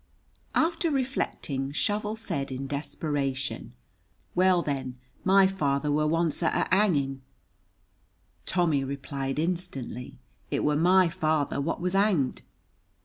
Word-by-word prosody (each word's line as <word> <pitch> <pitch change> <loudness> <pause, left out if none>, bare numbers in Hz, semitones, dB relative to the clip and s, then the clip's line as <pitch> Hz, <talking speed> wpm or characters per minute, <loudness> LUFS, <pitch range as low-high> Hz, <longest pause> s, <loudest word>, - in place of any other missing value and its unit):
After 330 +1 +2
reflecting, 250 - -2
Shovel 210 +6 0
said 140 -11 -3
in 130 +1 -4
desperation, 135 -4 -3 0.6
"Well, 180 -1 +4
then, 130 -3 -3 0.3
my 195 0 +6
father 150 -6 0
were 150 +1 +2
once 165 0 +1
at 165 - +1
a - - +2
hanging." 140 -10 +1 1.3
Tommy 165 -6 +2
replied 135 0 -4
instantly, 155 -7 -3 0.3
"It - - -1
were 150 0 +2
my 180 +4 +5
father 155 -3 0
what 165 +4 -2
was 180 +1 -1
hanged." 195 -9 +2
150 Hz, 115 wpm, -27 LUFS, 140-185 Hz, 1.3 s, my